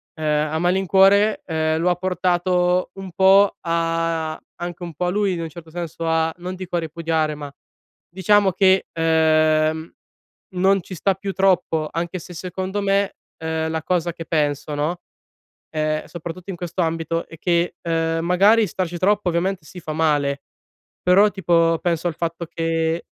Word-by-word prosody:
ehm, 150 Hz, -1 st, 0 dB
a 160 Hz, -, -1 dB
malincuore, 195 Hz, +4 st, +3 dB
ehm, 160 Hz, -1 st, 0 dB
lo 175 Hz, +2 st, +2 dB
ha -, -, +1 dB
portato 180 Hz, 0 st, +1 dB
un 195 Hz, -1 st, -8 dB
po' 195 Hz, +3 st, +5 dB
a 165 Hz, -1 st, -1 dB, 0.2 s
anche 175 Hz, 0 st, -6 dB
un 170 Hz, -1 st, -6 dB
po' 180 Hz, -, -2 dB
a -, -, +1 dB
lui 200 Hz, 0 st, +1 dB
in 170 Hz, -, -3 dB
un 165 Hz, -, -3 dB
certo 160 Hz, +1 st, -12 dB
senso 165 Hz, 0 st, -5 dB
a 160 Hz, 0 st, +1 dB
non 180 Hz, +1 st, -6 dB
dico 185 Hz, -1 st, -6 dB
a -, -, +2 dB
ripudiare, 160 Hz, -1 st, -1 dB
ma 145 Hz, -1 st, -8 dB, 0.6 s
diciamo 190 Hz, +2 st, +3 dB
che, 190 Hz, 0 st, +3 dB
ehm, 160 Hz, -1 st, +2 dB, 0.6 s
non 190 Hz, +1 st, +3 dB
ci 185 Hz, -, -10 dB
sta 195 Hz, +3 st, +1 dB
più 195 Hz, +1 st, -5 dB
troppo. 180 Hz, -5 st, +1 dB
Anche 170 Hz, +2 st, -3 dB
se 175 Hz, +2 st, -11 dB
secondo 185 Hz, +3 st, -4 dB
me, 200 Hz, 0 st, +1 dB, 0.2 s
ehm, 160 Hz, 0 st, -2 dB
la 160 Hz, 0 st, -2 dB
cosa 175 Hz, -1 st, 0 dB
che 165 Hz, -, -8 dB
penso, 150 Hz, -2 st, -1 dB
no, 155 Hz, +5 st, -2 dB, 0.7 s
ehm, 155 Hz, 0 st, -1 dB
soprattutto 175 Hz, +2 st, -8 dB
in 180 Hz, -, -7 dB
questo 175 Hz, +1 st, -3 dB
ambito 165 Hz, 0 st, -1 dB
è 165 Hz, -, -13 dB
che, 170 Hz, +1 st, 0 dB
ehm, 165 Hz, -1 st, -1 dB
magari 205 Hz, +5 st, +4 dB
starci 175 Hz, 0 st, -3 dB
troppo, 200 Hz, +1 st, +2 dB
ovviamente 175 Hz, +1 st, -1 dB
sì, 180 Hz, -, -10 dB
fa 155 Hz, -2 st, -5 dB
male, 145 Hz, -3 st, +1 dB, 0.6 s
però, 195 Hz, +4 st, +5 dB
tipo, 165 Hz, -4 st, +2 dB
penso 170 Hz, -1 st, 0 dB
al 170 Hz, -, -3 dB
fatto 170 Hz, +1 st, -3 dB
che 165 Hz, 0 st, -1 dB
170 Hz, 165 wpm, -21 LUFS, 160-185 Hz, 0.7 s, po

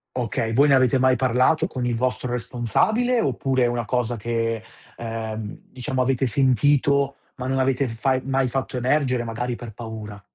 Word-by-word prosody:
Okay, 115 Hz, -2 st, -1 dB
voi 140 Hz, +5 st, +5 dB
ne 140 Hz, -, +5 dB
avete 130 Hz, -1 st, +4 dB
mai 130 Hz, 0 st, +4 dB
parlato 130 Hz, +6 st, +2 dB
con 130 Hz, -9 st, -4 dB
il 120 Hz, -1 st, 0 dB
vostro 125 Hz, +1 st, -1 dB
responsabile, 125 Hz, -, +1 dB
oppure 130 Hz, -, 0 dB
è -, -, +4 dB
una 120 Hz, -1 st, -2 dB
cosa 120 Hz, +1 st, -1 dB
che, 115 Hz, 0 st, -1 dB, 0.4 s
ehm, 110 Hz, -2 st, -5 dB
diciamo, 130 Hz, 0 st, -3 dB
avete 130 Hz, +1 st, +1 dB
sentito, 140 Hz, +2 st, +2 dB, 0.2 s
ma 130 Hz, -1 st, -5 dB
non 135 Hz, 0 st, 0 dB
avete 130 Hz, +1 st, +1 dB
fai 130 Hz, +3 st, 0 dB
mai 135 Hz, -1 st, +1 dB
fatto 130 Hz, +1 st, -3 dB
emergere, 130 Hz, -1 st, +1 dB
magari 120 Hz, +2 st, -3 dB
per 120 Hz, -1 st, -8 dB
paura? 110 Hz, -2 st, -8 dB
125 Hz, 170 wpm, -23 LUFS, 115-135 Hz, 0.4 s, voi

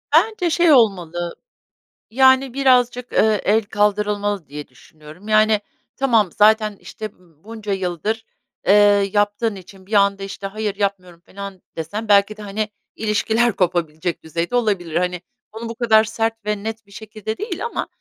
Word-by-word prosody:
Bence 365 Hz, 0 st, +3 dB
şey 340 Hz, 0 st, +3 dB
olmalı, 175 Hz, -, +2 dB, 0.8 s
yani, 260 Hz, 0 st, +4 dB
birazcık, 250 Hz, -2 st, +2 dB
eee, 215 Hz, -2 st, +3 dB
el 220 Hz, +3 st, +3 dB
kaldırılmalı 205 Hz, -2 st, 0 dB
diye 150 Hz, 0 st, -7 dB
düşünüyorum, 155 Hz, +8 st, -16 dB
yani, 215 Hz, -1 st, +3 dB, 0.3 s
tamam, 230 Hz, -9 st, +2 dB
zaten, 215 Hz, -1 st, +3 dB
işte, 220 Hz, -, -8 dB
ımm, 170 Hz, -5 st, -27 dB
bunca 215 Hz, -1 st, -7 dB
yıldır, 190 Hz, +4 st, -3 dB, 0.4 s
eee, 195 Hz, -, +6 dB, 0.4 s
yaptığın 205 Hz, +1 st, +1 dB
için 190 Hz, 0 st, -14 dB
bir 215 Hz, -, -10 dB
anda, 200 Hz, -1 st, +3 dB
işte, 195 Hz, 0 st, -6 dB
"Hayır, 210 Hz, 0 st, -3 dB
yapmıyorum." 185 Hz, -4 st, -3 dB
felan 200 Hz, -1 st, -9 dB, 0.2 s
desen 205 Hz, +7 st, -4 dB
belki 205 Hz, +1 st, +4 dB
de, -, -, -10 dB
hani, 210 Hz, +1 st, -3 dB, 0.3 s
ilişkiler 220 Hz, +2 st, +1 dB
kopabilecek 175 Hz, -2 st, -1 dB
düzeyde 170 Hz, +7 st, -3 dB
olabilir. 195 Hz, -9 st, 0 dB
Hani, 180 Hz, 0 st, -1 dB, 0.3 s
onu 225 Hz, +1 st, -7 dB
bu 230 Hz, -, -6 dB
kadar 220 Hz, -2 st, +4 dB
sert 225 Hz, 0 st, -3 dB
ve 210 Hz, -1 st, -2 dB
net 225 Hz, -1 st, -5 dB
bir 200 Hz, -, -23 dB
şekilde 215 Hz, +1 st, -7 dB
değil 430 Hz, +2 st, -4 dB
ama 470 Hz, -, -3 dB
210 Hz, 150 wpm, -20 LUFS, 190-225 Hz, 0.8 s, eee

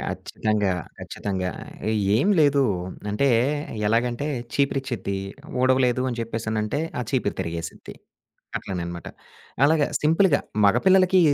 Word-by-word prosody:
ఖచ్చితంగా. 105 Hz, -3 st, -1 dB, 0.3 s
ఖచ్చితంగా. 95 Hz, -2 st, -3 dB, 0.7 s
ఏం 140 Hz, -, +2 dB
లేదు. 140 Hz, -2 st, +4 dB, 0.5 s
అంటే 135 Hz, +7 st, +2 dB, 0.6 s
ఎలాగంటే 120 Hz, +5 st, +1 dB, 0.3 s
చీపిరిచ్చిద్ది, 135 Hz, -7 st, -1 dB, 0.5 s
ఊడవలేదు 130 Hz, -1 st, +3 dB
అని 120 Hz, -, -5 dB
చెప్పేసనంటే 110 Hz, +2 st, -2 dB, 0.2 s
ఆ -, -, -1 dB
చీపిరి 125 Hz, -7 st, 0 dB
తిరిగేసిద్ది. 85 Hz, 0 st, -6 dB, 0.6 s
అట్లనే 90 Hz, -3 st, -4 dB
అనమాట. 85 Hz, -1 st, -7 dB, 0.6 s
అలాగ 155 Hz, +1 st, +4 dB, 0.2 s
సింపుల్‌గా 160 Hz, +1 st, +3 dB, 0.2 s
మగపిల్లలకి 185 Hz, -, +5 dB
120 Hz, 95 wpm, -24 LUFS, 105-140 Hz, 0.7 s, మగపిల్లలకి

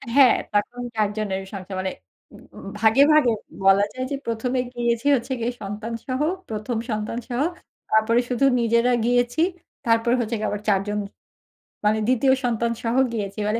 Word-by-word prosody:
হ্যাঁ 270 Hz, -4 st, +7 dB, 0.2 s
তখন 240 Hz, +4 st, 0 dB
৪ 210 Hz, -2 st, +2 dB
জনের 195 Hz, -3 st, -2 dB
সংসার 190 Hz, 0 st, -6 dB
মানে, 190 Hz, 0 st, -2 dB, 0.9 s
ভাগে 225 Hz, +5 st, +4 dB
ভাগে 295 Hz, -6 st, +5 dB, 0.3 s
বলা 195 Hz, +1 st, +6 dB
যায় 255 Hz, 0 st, -3 dB
যে 280 Hz, -, 0 dB
১ম 230 Hz, +2 st, -2 dB
এ -, -, +3 dB
গিয়েছি 235 Hz, +1 st, -1 dB
হচ্ছে 250 Hz, +2 st, -4 dB
গিয়ে 235 Hz, +2 st, -1 dB
সন্তান 210 Hz, +3 st, -5 dB
সহ, 260 Hz, +2 st, -2 dB, 0.3 s
১ম 220 Hz, +2 st, -3 dB
সন্তানসহ, 235 Hz, +3 st, -3 dB, 0.5 s
তারপরে 220 Hz, +2 st, +3 dB
শুধু 250 Hz, +2 st, +2 dB
নিজেরা 235 Hz, +1 st, +3 dB
গিয়েছি। 245 Hz, +3 st, +1 dB, 0.4 s
তারপরে 230 Hz, +1 st, +3 dB
হচ্ছে 235 Hz, 0 st, -1 dB
গিয়ে 215 Hz, -, -1 dB
আবার 205 Hz, -, -4 dB
৪ 195 Hz, -2 st, +3 dB
জন 210 Hz, 0 st, -1 dB, 0.9 s
মানে, 215 Hz, +1 st, +3 dB
২য় 255 Hz, +1 st, +3 dB
সন্তানসহ 235 Hz, 0 st, -1 dB, 0.2 s
গিয়েছি। 205 Hz, -2 st, -4 dB
মানে 225 Hz, +2 st, 0 dB
230 Hz, 155 wpm, -23 LUFS, 210-245 Hz, 0.9 s, হ্যাঁ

